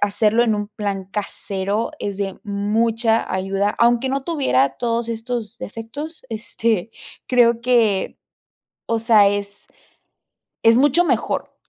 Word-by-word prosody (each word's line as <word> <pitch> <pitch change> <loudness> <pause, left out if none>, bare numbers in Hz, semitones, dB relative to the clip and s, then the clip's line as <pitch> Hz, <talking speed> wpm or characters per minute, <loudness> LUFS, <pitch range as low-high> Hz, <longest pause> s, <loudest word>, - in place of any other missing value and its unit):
hacerlo 210 +3 +2
en 220 -2 +2
un 205 0 -3
plan 200 -2 -4
casero 200 +1 -3
es 200 -1 -4
de 195 -2 -3
mucha 225 +3 0
ayuda. 195 +2 0
Aunque 240 +2 +3
no 270 +1 -1
tuviera 200 - +1
todos 235 -1 -1
estos 230 -1 -4
defectos, 270 +9 -7
este, 225 -2 -2 0.4
creo 235 -2 +3
que, 235 -5 +1 0.7
o 230 0 0
sea, 220 -3 +5
es 200 0 -4 1.0
es 230 +1 +6
mucho 290 +6 +4
mejor. - - -1
225 Hz, 125 wpm, -21 LUFS, 205-235 Hz, 1.0 s, es